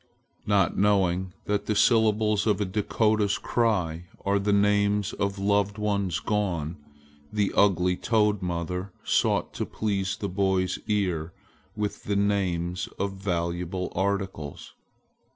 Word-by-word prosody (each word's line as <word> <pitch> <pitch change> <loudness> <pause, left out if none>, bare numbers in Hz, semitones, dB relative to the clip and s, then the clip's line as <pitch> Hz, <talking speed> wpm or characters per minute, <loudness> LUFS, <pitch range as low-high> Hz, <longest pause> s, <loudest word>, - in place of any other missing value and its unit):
Not 100 -4 +3
knowing 95 -2 +2
that 105 0 -1
the 105 - +1
syllables 110 -1 +3
of 105 -2 +2
a 105 - +1
Dakota's 105 +1 +1
cry 90 -8 0 0.2
are 100 0 +2
the 100 +1 0
names 100 0 +2
of 100 0 -2
loved 100 +1 +1
ones 100 -4 0
gone, 90 -7 -1 0.5
the 105 -2 0
ugly 90 -2 +3
toad 105 -3 +2
mother 90 +2 -3
sought - - +1
to - - -2
please 100 -3 -2
the 100 - -3
boy's 95 -1 0
ear 90 -6 -1 0.4
with 105 -1 -3
the 100 - 0
names 95 -2 0
of 100 0 -2
valuable 90 -1 -2
articles. 95 -6 -3
100 Hz, 125 wpm, -26 LUFS, 90-105 Hz, 0.5 s, Not